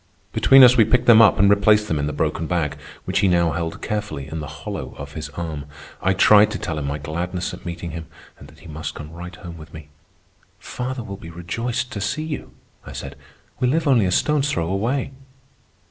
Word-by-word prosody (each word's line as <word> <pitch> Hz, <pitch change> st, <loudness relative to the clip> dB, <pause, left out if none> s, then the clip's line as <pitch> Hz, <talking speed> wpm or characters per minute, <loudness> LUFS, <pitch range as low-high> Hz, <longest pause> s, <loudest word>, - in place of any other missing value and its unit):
Between 135 Hz, 0 st, +7 dB
us 125 Hz, 0 st, +7 dB
we 115 Hz, -, +7 dB
picked 125 Hz, +3 st, +2 dB
them 115 Hz, -1 st, +8 dB
up 110 Hz, -, +6 dB
and 100 Hz, -, +5 dB
replaced 105 Hz, +1 st, +4 dB
them 80 Hz, -5 st, -1 dB
in 70 Hz, -, -1 dB
the -, -, -2 dB
broken 80 Hz, +2 st, -2 dB
bag, 85 Hz, -4 st, -1 dB, 0.3 s
which -, -, 0 dB
he 100 Hz, -, +3 dB
now 85 Hz, -2 st, +3 dB
held 80 Hz, +1 st, -4 dB
carefully 105 Hz, -10 st, -4 dB
in 80 Hz, +3 st, -5 dB
the 75 Hz, -, -6 dB
hollow -, -, -7 dB
of 70 Hz, 0 st, -8 dB
his 75 Hz, -2 st, -6 dB
arm. 80 Hz, -4 st, -4 dB, 0.4 s
I 95 Hz, -, +2 dB
tried 105 Hz, +3 st, +6 dB
to 105 Hz, -, -4 dB
tell 80 Hz, -3 st, -4 dB
him 70 Hz, -, -3 dB
my 70 Hz, +1 st, -2 dB
gladness 85 Hz, +5 st, -4 dB
at 90 Hz, -, -9 dB
meeting 85 Hz, 0 st, -5 dB
him 80 Hz, 0 st, -7 dB, 0.3 s
and -, -, -12 dB
that -, -, -18 dB
he -, -, -13 dB
must 80 Hz, +1 st, -6 dB
come 75 Hz, 0 st, -9 dB
right 90 Hz, +1 st, -9 dB
home 85 Hz, -3 st, -10 dB
with 80 Hz, +1 st, -12 dB
me. 75 Hz, -2 st, -11 dB, 0.7 s
"Father 125 Hz, 0 st, -5 dB
will 100 Hz, -2 st, -7 dB
be 85 Hz, -, -10 dB
rejoiced 115 Hz, +9 st, -4 dB
to 100 Hz, -, -5 dB
see 150 Hz, +10 st, -2 dB
you," 155 Hz, -2 st, -6 dB, 0.3 s
I -, -, -10 dB
said. -, -, -7 dB, 0.4 s
"We 125 Hz, -, +2 dB
live 155 Hz, +5 st, +1 dB
only 120 Hz, -7 st, +4 dB
a -, -, -1 dB
stone's 150 Hz, +7 st, +1 dB
throw 85 Hz, -, -1 dB
away. 120 Hz, +9 st, -1 dB
90 Hz, 225 wpm, -22 LUFS, 80-110 Hz, 0.7 s, them